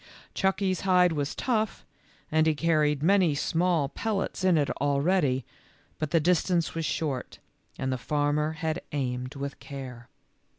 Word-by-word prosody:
Chucky 190 Hz, 0 st, +1 dB
's 185 Hz, -, -5 dB
hide 180 Hz, -2 st, +4 dB
was 145 Hz, -2 st, -2 dB
tough 220 Hz, -4 st, -1 dB, 0.5 s
and 155 Hz, 0 st, +3 dB
he 155 Hz, -, +3 dB
carried 150 Hz, -2 st, +1 dB
many 185 Hz, -4 st, +4 dB
small 165 Hz, -1 st, +1 dB
pel 220 Hz, +9 st, -3 dB
lets 195 Hz, -1 st, -3 dB
in 185 Hz, -3 st, +4 dB
it 145 Hz, -2 st, +1 dB
already, 140 Hz, -2 st, +2 dB, 0.5 s
but 155 Hz, -, -2 dB
the 165 Hz, -, +3 dB
distance 175 Hz, +1 st, +1 dB
was 165 Hz, -1 st, -2 dB
short, 140 Hz, -2 st, -3 dB, 0.4 s
and 130 Hz, 0 st, -1 dB
the 130 Hz, -, -3 dB
farmer 150 Hz, +4 st, 0 dB
had 160 Hz, +1 st, -2 dB
aimed 125 Hz, -1 st, -3 dB
with 140 Hz, 0 st, -5 dB
care. 130 Hz, -4 st, -9 dB
155 Hz, 155 wpm, -27 LUFS, 140-180 Hz, 0.5 s, hide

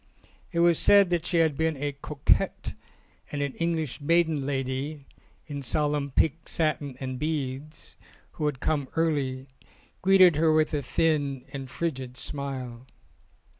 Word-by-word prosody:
It 170 Hz, -2 st, +1 dB
was 170 Hz, -1 st, +4 dB
said 200 Hz, -3 st, +6 dB
that 170 Hz, -1 st, 0 dB
she 175 Hz, -, +1 dB
had 160 Hz, -3 st, +3 dB
been 160 Hz, 0 st, 0 dB
a 145 Hz, +1 st, -2 dB
cocotte, 145 Hz, +1 st, 0 dB, 0.6 s
and 145 Hz, -, -3 dB
an 140 Hz, -2 st, -3 dB
English 160 Hz, -4 st, -1 dB
maiden 160 Hz, -2 st, +2 dB
lady 135 Hz, +2 st, -3 dB, 0.4 s
(in 145 Hz, -2 st, -5 dB
salmon 145 Hz, +1 st, 0 dB
pink 155 Hz, +3 st, 0 dB
satin 150 Hz, -5 st, -1 dB
and 130 Hz, -1 st, -4 dB
beads) 150 Hz, -1 st, -4 dB, 0.3 s
who 150 Hz, -, -2 dB
had 140 Hz, -3 st, -2 dB
come 145 Hz, -2 st, 0 dB
early, 140 Hz, -5 st, 0 dB, 0.5 s
greeted 185 Hz, -4 st, +6 dB
her 160 Hz, 0 st, +4 dB
with 155 Hz, 0 st, +2 dB
a 145 Hz, -, 0 dB
thin 145 Hz, -4 st, 0 dB
and 135 Hz, -2 st, -6 dB
frigid 130 Hz, -6 st, -4 dB
smile. 130 Hz, -4 st, -5 dB
145 Hz, 140 wpm, -27 LUFS, 135-160 Hz, 0.6 s, said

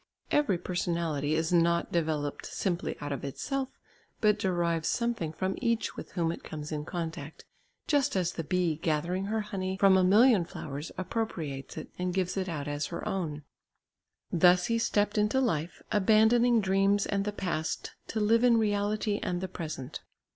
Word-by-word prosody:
Every 290 Hz, -11 st, +3 dB
personality 170 Hz, -4 st, -1 dB
is 160 Hz, +2 st, 0 dB
not 170 Hz, 0 st, +3 dB
developed 155 Hz, -4 st, -1 dB
simply 180 Hz, -3 st, -2 dB
out 145 Hz, 0 st, -4 dB
of 140 Hz, -, -4 dB
itself, 265 Hz, -, -3 dB, 0.4 s
but 210 Hz, -2 st, +3 dB
derives 170 Hz, -4 st, 0 dB
something 235 Hz, -10 st, -1 dB
from 185 Hz, +4 st, -2 dB
each 230 Hz, -1 st, 0 dB
with -, -, -9 dB
whom 170 Hz, -3 st, 0 dB
it -, -, -7 dB
comes 150 Hz, 0 st, -7 dB
in 150 Hz, -1 st, -3 dB
contact, 160 Hz, -4 st, -5 dB, 0.4 s
just 285 Hz, -7 st, +2 dB
as 180 Hz, -2 st, +1 dB
the 165 Hz, -, -4 dB
bee 175 Hz, -1 st, 0 dB
gathering 170 Hz, +3 st, -1 dB
her 220 Hz, +2 st, -1 dB
honey 190 Hz, -2 st, -3 dB
from 195 Hz, -1 st, +6 dB
a 185 Hz, -, +4 dB
million 210 Hz, +2 st, +6 dB
flowers, 150 Hz, -2 st, -6 dB
appropriates 175 Hz, -9 st, -4 dB
it -, -, -6 dB
and 180 Hz, 0 st, -1 dB
gives 185 Hz, -1 st, 0 dB
it 190 Hz, -1 st, -2 dB
out 150 Hz, -4 st, -4 dB
as 145 Hz, 0 st, -2 dB
her 170 Hz, -, -5 dB
own. 155 Hz, -6 st, -3 dB, 0.9 s
Thus 180 Hz, +1 st, +5 dB
he 230 Hz, 0 st, +1 dB
stepped 210 Hz, -1 st, +1 dB
into 210 Hz, +5 st, +2 dB
life, 175 Hz, -, -1 dB
abandoning 220 Hz, +3 st, +4 dB
dreams 195 Hz, +1 st, +2 dB
and 200 Hz, -1 st, 0 dB
the 210 Hz, -, -2 dB
past 170 Hz, -6 st, -3 dB, 0.2 s
to 220 Hz, -, -2 dB
live 225 Hz, +3 st, +3 dB
in 240 Hz, -2 st, +6 dB
reality 205 Hz, -1 st, 0 dB
and 175 Hz, -1 st, -1 dB
the 190 Hz, -, -3 dB
present. 155 Hz, -7 st, -6 dB
185 Hz, 170 wpm, -29 LUFS, 165-210 Hz, 0.9 s, from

